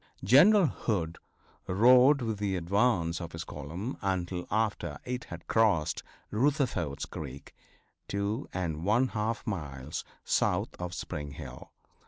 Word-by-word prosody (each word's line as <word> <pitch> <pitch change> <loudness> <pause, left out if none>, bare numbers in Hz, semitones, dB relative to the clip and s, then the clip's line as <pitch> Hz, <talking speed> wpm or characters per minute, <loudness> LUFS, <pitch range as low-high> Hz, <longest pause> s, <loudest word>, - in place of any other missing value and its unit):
General 175 - +7
Hood 90 - -2 0.5
rode 125 +7 +6
with 110 -3 -2
the 100 -2 0
advance 90 -2 +1
of 85 0 -7
his 80 0 -4
column 90 - -6
until 90 -2 -2
after 105 -9 -1
it 125 0 -3
had 85 -1 -9
crossed 105 -9 +2 0.3
Rutherford's 115 - 0
creek, 70 -2 -8 0.5
two 100 +6 -2
and 85 -4 -3
one 115 +7 +3
half 110 +2 -2
miles 75 - -4 0.2
south - - +1
of 90 0 -4
Spring 75 -1 -5
Hill. 65 -4 -9
95 Hz, 125 wpm, -30 LUFS, 80-115 Hz, 0.5 s, General